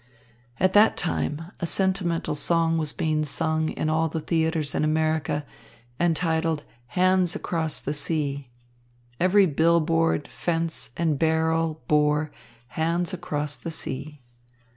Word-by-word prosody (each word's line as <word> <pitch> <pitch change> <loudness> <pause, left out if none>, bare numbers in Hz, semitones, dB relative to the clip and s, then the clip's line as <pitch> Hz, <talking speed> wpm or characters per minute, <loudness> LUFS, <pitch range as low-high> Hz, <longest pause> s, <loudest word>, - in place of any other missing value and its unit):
At 185 +1 +2
that 210 +2 +5
time 165 0 -2
a 170 - -2
sentimental 185 -3 0
song 165 +2 +2
was 155 -2 +1
being 155 -1 0
sung 155 +2 0
in - - -3
all 160 +1 +1
the 160 - -3
theatres 160 -1 0
in - - 0
America, 155 -1 0 0.5
entitled 165 -2 0 0.3
"Hands 185 -1 +3
Across 160 -3 -2
the 145 - -3
Sea." 145 -3 -2 0.7
Every 190 +2 +5
bill 165 +1 +3
board, 165 -2 +1
fence 165 -5 -2
and 160 -4 0
barrel 160 -1 +1
bore 150 0 +2 0.4
"Hands 170 +5 -1
Across 150 -5 -3
the 165 - -6
Sea." 150 -1 -6
160 Hz, 125 wpm, -25 LUFS, 150-170 Hz, 0.7 s, that